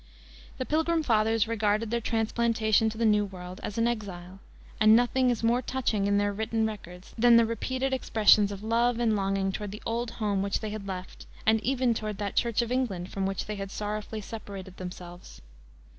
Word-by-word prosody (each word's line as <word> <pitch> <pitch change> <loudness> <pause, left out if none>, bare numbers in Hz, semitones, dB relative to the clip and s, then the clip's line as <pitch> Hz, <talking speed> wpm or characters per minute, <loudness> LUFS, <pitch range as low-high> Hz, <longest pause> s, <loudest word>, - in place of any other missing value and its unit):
The 255 - -3
Pilgrim 320 +2 +1
fathers 225 -3 +2
regarded 215 0 0
their 235 0 0
transplantation 225 -1 +1
to 220 - -8
the 230 - +1
New 210 -1 +4
World 185 -2 -8
as 210 - -5
an 230 +1 +2
exile, 195 -5 -5 0.4
and 215 0 +7
nothing 250 +2 +3
is 235 -2 -1
more 235 +2 +3
touching 230 -6 -1
in 200 0 +2
their 205 0 +1
written 220 +2 -1
records 185 -4 -7
than 235 0 +7
the 230 - +5
repeated 260 +4 -2
expressions 215 -5 +4
of 200 0 -7
love 230 +2 +2
and 225 -2 +2
longing 195 -1 0
toward 205 +1 -5
the 210 +3 -9
old 235 +1 -2
home 205 -3 0
which 200 0 -1
they 215 -1 -5
had 210 -2 -6
left, 185 -1 -7 0.2
and 220 0 +3
even 255 -1 +1
toward 215 -2 -4
that 200 -1 -4
Church 235 0 +2
of 235 - -6
England 205 -9 -2
from 195 -1 -1
which 195 -1 -3
they 210 -1 -5
had 195 0 -5
sorrowfully 210 +1 -4
separated 195 -3 -8
themselves. 180 -1 -9
215 Hz, 195 wpm, -28 LUFS, 200-230 Hz, 0.4 s, and